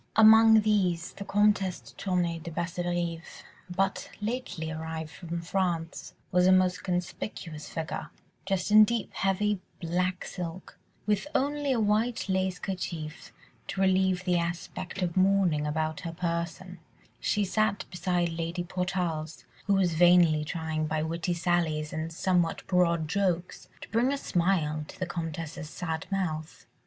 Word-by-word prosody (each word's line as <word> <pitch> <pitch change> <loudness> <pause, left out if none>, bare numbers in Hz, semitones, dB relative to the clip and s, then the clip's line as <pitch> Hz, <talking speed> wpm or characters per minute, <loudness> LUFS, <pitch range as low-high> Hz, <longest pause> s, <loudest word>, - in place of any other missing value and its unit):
Among 220 0 +8
these 185 -5 +1
the - - -7
Comtesse 200 -2 +2
de - - -15
Tournay 175 -3 -1
de 170 +1 -7
Basserive, 175 0 -3 0.3
but 195 +2 -1
lately 210 -8 -3
arrived 160 -1 -5
from 170 -1 -5
France, 170 -2 -2 0.2
was 180 0 +4
a - - +7
most 185 -1 +3
conspicuous 175 -3 -4
figure: 160 -1 -4 0.4
dressed 195 0 0
in 215 0 +9
deep, 230 0 -1
heavy 195 +1 +1 0.2
black 180 +2 -1
silk, 180 0 -7 0.3
with 210 +6 +1
only 285 +1 +1
a 250 - +2
white 220 +3 +1
lace 190 -1 0
kerchief 170 -5 -5 0.4
to 195 - -4
relieve 190 -1 +3
the 180 -2 +2
aspect 175 +2 -4
of 170 -2 -2
mourning 185 -6 +3
about 155 +1 -1
her 165 -1 -5
person, 170 +1 -3 0.4
she 205 -1 +1
sat 215 +1 0
beside 180 -1 0
Lady 165 +2 -3
Portarles, 175 -4 -3 0.2
who 200 - +4
was 185 -3 +2
vainly 170 -2 +5
trying 155 -1 -2
by 155 0 -1
witty 170 +2 -1
sallies 165 -3 0
and 155 +1 -3
somewhat 175 -1 0
broad 170 -3 +2
jokes, 180 0 -1
to - - -9
bring 240 +4 +2
a 280 - 0
smile 170 - 0
to - - -12
the 185 - -2
Comtesse's 165 -2 -5
sad 165 -1 -4
mouth. 160 -5 -3
180 Hz, 145 wpm, -28 LUFS, 165-195 Hz, 0.4 s, in